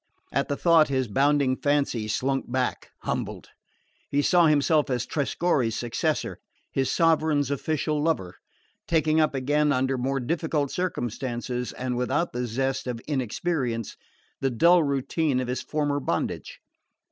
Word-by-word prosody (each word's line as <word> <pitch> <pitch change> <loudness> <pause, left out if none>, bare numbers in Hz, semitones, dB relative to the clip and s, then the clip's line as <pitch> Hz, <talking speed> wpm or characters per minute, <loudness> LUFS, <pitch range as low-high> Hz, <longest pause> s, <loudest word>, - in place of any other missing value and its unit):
At - - 0
the 140 - -2
thought, 165 -3 +5
his 130 -2 0
bounding 135 +3 +2
fancy 140 -6 0
slunk 130 +4 -1
back 130 -1 -1
humbled. - - -4 0.6
He 145 +1 +1
saw 175 0 +5
himself 150 0 +3
as 125 -3 -1
Trescorre's 140 -5 0
successor, 120 -1 -2 0.3
his 135 -1 0
sovereign's 155 -4 +2
official 150 +1 -1
lover, 95 - -1 0.5
taking 160 -1 +3
up 155 -2 +1
again, 145 +3 +2
under 130 0 +1
more 135 +2 0
difficult 150 +1 -1
circumstances, 125 - -3
and 125 -1 -3
without 135 +7 0
the 125 0 -2
zest 130 +3 -2
of 120 -2 -3
inexperience, 130 - -2 0.4
the 135 - +1
dull 170 +8 +5
routine 140 0 0
of 130 - -2
his 125 +1 -2
former 145 -2 -1
bondage. - - -3
140 Hz, 135 wpm, -26 LUFS, 125-155 Hz, 0.6 s, thought